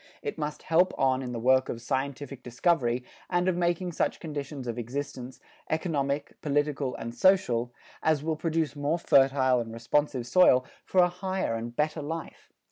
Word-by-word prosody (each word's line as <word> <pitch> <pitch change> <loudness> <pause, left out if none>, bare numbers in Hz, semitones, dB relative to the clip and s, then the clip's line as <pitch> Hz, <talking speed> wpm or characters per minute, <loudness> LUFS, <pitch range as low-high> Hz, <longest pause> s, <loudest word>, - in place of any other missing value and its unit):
It 440 - -3
must 150 0 -4
help 175 +3 +3
on 130 -1 +2
in 125 -2 -5
the 120 - -4
work 130 +2 +3
of 115 - -4
scientific 135 +2 -3
discovery 125 -1 +1 0.3
and 175 0 +1
of 185 - +2
making 175 +1 0
such - - -1
conditions 145 -3 -5
of 120 0 -3
existence, 130 +1 -5 0.3
economic, 145 -3 -2
political 145 -2 0
and 115 +1 -6
social, 125 -10 +3 0.3
as 155 -2 +2
will 160 0 0
produce 160 -1 -1
more 145 +3 0
fertile 135 -5 +4
and 115 -1 -4
responsive 125 +2 0
soil 130 -2 +5 0.2
for 185 -1 +4
a - - +4
higher 185 -4 -2
and 115 +1 -5
better 150 +2 0
life. 160 +3 -7
145 Hz, 165 wpm, -28 LUFS, 125-165 Hz, 0.3 s, soil